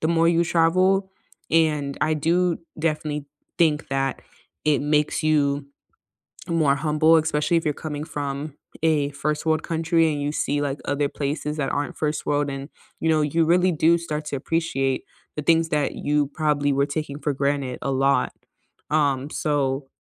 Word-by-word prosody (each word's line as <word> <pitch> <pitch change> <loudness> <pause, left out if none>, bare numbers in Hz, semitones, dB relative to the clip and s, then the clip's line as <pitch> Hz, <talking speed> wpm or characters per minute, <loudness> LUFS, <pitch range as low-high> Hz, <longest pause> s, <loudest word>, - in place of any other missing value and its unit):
the 160 - 0
more 165 0 +3
you 170 0 +3
travel, 185 +4 +2 0.4
and 150 -3 +1
I 155 0 +2
do 170 +3 +1 0.2
definitely 150 -2 -2 0.3
think 155 -3 +2
that 135 -1 -1 0.4
it 150 -2 +3
makes 150 +2 +1
you 145 -2 +2 0.8
more 155 -5 +2
humble, 155 +2 +3
especially 160 +1 +1
if 165 - -2
you're 150 - +1
coming 150 -1 -3
from 145 0 -4 0.3
a 150 -3 +2
1st 150 +2 -2
world 160 0 +1
country 165 0 +1
and 145 - -3
you 145 +1 -1
see, 145 -1 -1
like, 140 0 -2
other 145 0 0
places 150 +2 -3
that 140 -3 -1
aren't 145 0 -2
1st 150 0 -2
world, 145 -1 +1
and, 135 +2 -6 0.3
you - - -1
know, 155 -1 +3
you 160 +3 +2
really 180 +3 +3
do 165 +1 +3
start 150 -2 -4
to 145 - -3
appreciate 135 -3 -1 0.3
the 150 - -3
things 165 +1 +3
that 150 -3 0
you 145 -1 +1
probably 150 -3 +1
were 140 +1 +2
taking 145 -1 -4
for 145 -2 -1
granted 140 -2 -1
a 135 - -2
lot 135 +1 +2 0.6
um, 140 -2 +1
so 140 -2 -1
150 Hz, 170 wpm, -23 LUFS, 140-160 Hz, 0.8 s, more